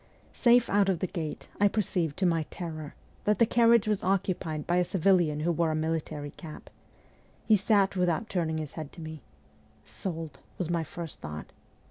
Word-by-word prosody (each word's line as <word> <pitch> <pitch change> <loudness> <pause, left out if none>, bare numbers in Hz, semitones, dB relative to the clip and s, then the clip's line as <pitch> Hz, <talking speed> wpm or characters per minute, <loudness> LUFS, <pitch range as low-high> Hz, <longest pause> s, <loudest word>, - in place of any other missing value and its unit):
Safe 240 -1 +5
out 200 0 +3
of 185 - +2
the 185 - -1
gate, 165 -4 -5
I 205 - +6
perceived, 180 -7 0
to 190 - +1
my 165 -3 +1
terror, 155 -4 -6 0.3
that 210 0 +3
the 230 - +5
carriage 235 -1 +4
was 210 -2 0
occupied 180 -5 -1
by 175 - +1
a 180 - +4
civilian 175 -4 +2
who 170 +3 +1
wore 170 0 +1
a 155 - 0
military 155 -2 -2
cap. 155 -2 -11 0.7
He 220 - +6
sat 200 -1 +3
without 180 +3 +1
turning 165 -5 -1
his 155 -2 -4
head 155 -3 -7
to 170 - -10
me. 155 -2 -7 0.4
' - - -32 0.2
Sold! 160 -6 -6
' - - -32
was 175 -2 -2
my 170 -1 +1
first 165 0 -8
thought. 75 0 -7
170 Hz, 190 wpm, -29 LUFS, 155-195 Hz, 0.7 s, I